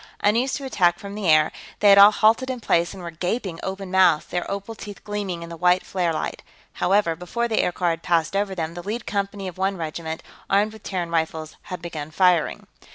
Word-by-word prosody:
Unused 235 +6 +2
to 280 - -5
attack 175 -9 +2
from 200 +2 -8
the 205 -4 -2
air, 155 0 +5 0.3
they 205 - +5
had 200 0 +8
all 200 +1 +11
halted 220 +5 +3
in 255 -1 -3
place 170 -6 +1
and 190 -2 -9
were 170 - -5
gaping 180 +1 -3
open 190 0 -5
mouthed, 185 -5 +4
their 175 - -2
opal 200 +3 -4
teeth 205 -2 -10
gleaming 200 -5 -4
in 170 - -9
the 170 - -7
white 180 +2 +2
flare 180 -3 0
light. 160 - -3 0.3
However, 190 -3 +2
before 200 +8 -2
the 220 -2 +1
aircar 175 -1 0
had 165 0 -4
passed 170 +1 +1
over 200 -1 0
them, 165 -2 -3
the 175 - -7
lead 215 +6 -4
company 200 -1 -3
of 185 0 -8
one 195 0 0
regiment, 160 0 -5 0.3
armed 205 +2 +2
with 220 - -13
Terran 180 -4 -3
rifles, 160 -1 -2
had 180 -2 -7
begun 155 -3 -5
firing. 175 0 +2
185 Hz, 220 wpm, -23 LUFS, 170-205 Hz, 0.3 s, all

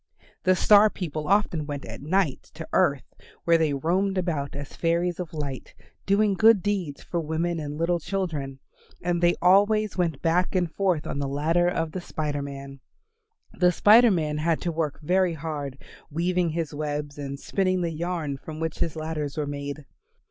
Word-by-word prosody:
The 185 0 +5
Star 210 +3 +6
people 155 -6 -5
often 185 -6 +1
went 145 -2 -5
at - - -8
night 160 -1 0
to - - -7
earth - - +1 0.3
where 170 -1 +4
they 160 -2 +2
roamed 185 +7 0
about 155 -7 -2
as 140 -1 -7
fairies 170 +1 0
of 175 -3 -5
light, 140 -5 -6 0.3
doing 200 +1 +3
good 215 0 +5
deeds 190 -8 -2
for 175 - -3
women 165 +2 -1
and 150 -1 -5
little 170 +2 +1
children, 155 -7 -3 0.5
and 175 0 0
they 175 0 +4
always 205 +2 +4
went 165 -6 -1
back 180 +3 +1
and 175 -3 0
forth 185 -6 0
on - - -3
the 140 - -1
ladder 160 +5 +1
of 165 -2 -1
the 185 - -5
Spider 150 -4 -3
Man. 140 -1 -8 0.7
The 180 -1 +3
Spider 225 +6 +6
Man 155 -6 0
had 165 +1 +1
to 175 - -1
work 155 -3 -2
very 180 +2 +2
hard, 145 -3 -5 0.3
weaving 175 +2 0
his 160 -1 -3
webs, 145 -1 -4
and 140 -1 -5
spinning 185 +1 0
the 170 -1 -1
yarn 160 -3 -3
from 155 +2 -9
which 160 -1 -3
his 165 - -1
ladders 155 -2 -4
were 150 - 0
made. 145 0 -5
165 Hz, 175 wpm, -26 LUFS, 150-180 Hz, 0.7 s, Star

